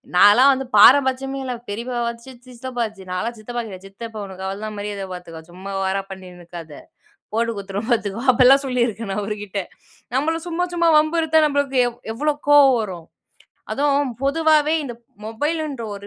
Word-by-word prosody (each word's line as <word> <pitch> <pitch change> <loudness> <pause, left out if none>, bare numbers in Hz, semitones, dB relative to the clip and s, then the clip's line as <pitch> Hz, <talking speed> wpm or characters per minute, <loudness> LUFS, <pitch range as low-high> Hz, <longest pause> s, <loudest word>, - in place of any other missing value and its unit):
நான்லாம் 240 +9 +7
வந்து 265 0 -3
பாரபட்சியமே 270 +3 +5
இல்ல, 255 -1 -3 0.2
பெரியப்பா 235 +4 -4
வாச்சு, 235 +3 -7 0.2
சித்தப்பா 250 0 -6
வாச்சு. 215 -4 -6
நான்லாம் 225 +6 -3
சித்தப்பா 240 +3 -5
கிட்ட, 190 -3 -9
"சித்தப்பா 220 +2 -9
உனக்கு 190 -1 -9
அவ்ள 195 +1 -5
தான் 215 -1 -6
மரியாத 205 -1 -4
பாத்துக்கோ. 170 -2 -9
சும்மா 190 +2 -8
ஓவரா 190 +1 0
பண்ணிட்டு 185 -2 -10
இருக்காத. 165 -3 -10 0.6
போட்டு 230 +1 0
குடுத்துருவோம் 200 +3 -5
பாத்துக்கோ" 215 -1 0
அப்டில்லாம் 260 +3 +5
சொல்லி 250 -2 +1
இருக்கேன் 220 -1 -5
நான் 205 +2 -2
அவருகிட்ட. 205 -1 -4 0.5
நம்பள 325 +4 0
சும்மா 350 +1 -1
சும்மா 340 -1 +3
வம்பு 310 +2 +2
இத்தா 315 0 +4
நம்பளுக்கு 280 -2 0
எவ் 240 - -7 0.2
எவ்ளோ 300 +5 0 0.2
கோவம் 280 -3 +7
வரும்? 180 -6 -7 0.6
அதுவும் 285 -2 +1
பொதுவாவே 310 +1 +3
இந்த 245 -3 -6 0.3
மொபைல்ன்ற 290 +3 -3
ஒரு 200 0 -10
235 Hz, 165 wpm, -21 LUFS, 200-275 Hz, 0.6 s, நான்லாம்